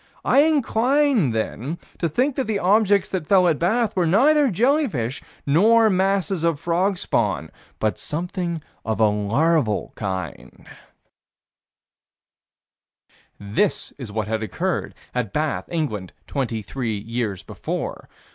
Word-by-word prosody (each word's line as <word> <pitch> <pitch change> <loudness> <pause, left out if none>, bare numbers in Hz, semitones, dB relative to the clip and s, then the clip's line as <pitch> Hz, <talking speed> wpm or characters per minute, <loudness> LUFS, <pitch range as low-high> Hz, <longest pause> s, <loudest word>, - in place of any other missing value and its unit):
I - - +4
incline, 280 - +3
then, 115 +7 -3 0.2
to 170 - 0
think 255 - +1
that 265 - -1
the 215 -2 0
objects 200 0 +3
that 180 -6 -3
fell 185 -2 +5
at 160 -4 +1
Bath 220 +6 +1
were 180 -3 +2
neither 280 - +4
jellyfish 220 - +1 0.2
nor 220 +9 +5
masses 190 -2 +1
of 165 -3 +1
frog 180 +4 0
spawn, - - -1 0.3
but 110 -1 -1
something 170 0 -3 0.2
of 110 0 -2
a 110 - +5
larval 110 +5 +1
kind 95 - -6 2.7
This 105 - -1
is 120 -6 -7
what 110 -1 -2
had 110 0 -1
occurred 170 - -2 0.2
at 125 -5 -2
Bath, 150 -1 -1
England, 120 - -3
23 115 -3 -3
years 110 -2 -3
before. - - -5
165 Hz, 120 wpm, -22 LUFS, -, 2.7 s, fell